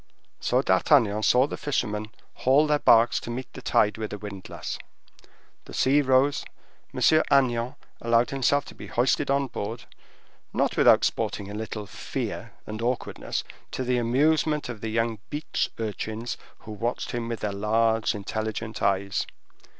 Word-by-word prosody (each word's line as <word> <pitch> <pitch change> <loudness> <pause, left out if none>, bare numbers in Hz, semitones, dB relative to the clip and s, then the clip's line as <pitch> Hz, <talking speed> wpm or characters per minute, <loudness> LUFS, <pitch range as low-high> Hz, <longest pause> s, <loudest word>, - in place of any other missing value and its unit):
So - - +1
D'Artagnan 105 -1 +3
saw 125 +4 +5
the - - -5
fishermen 110 -7 -2 0.3
haul 135 +4 +4
their 150 -1 +2
barks 115 -2 +5
to - - -8
meet 125 +2 -5
the - - -9
tide 105 +1 +2
with 110 -1 -4
a 105 - -4
windlass. 100 -2 -7 0.9
The - - -9
sea 140 +3 +4
rose; 135 +1 +3 0.5
M. - - -6
Agnan 130 -5 +3 0.3
allowed 115 0 +2
himself 140 +1 +2
to - - -11
be - - -10
hoisted 130 +3 +1
on 140 0 +2
board, 115 -2 -5 0.7
not - - +1
without - - +6
sporting 100 0 -2
a - - -7
little 105 0 -5
fear - - -5
and 110 +1 -6
awkwardness, 120 +1 -2 0.3
to 130 - -2
the 125 0 +1
amusement 150 +5 +2
of 110 -4 -6
the 110 - -3
young 115 0 0
beach 150 +1 -2
urchins 110 +1 -4 0.3
who 110 - -9
watched 115 +4 -3
him 120 -1 -3
with 115 -1 -4
their 105 -1 -2
large 110 +2 +1
intelligent 110 +1 -4
eyes. 100 0 +1
115 Hz, 155 wpm, -26 LUFS, 110-130 Hz, 0.9 s, without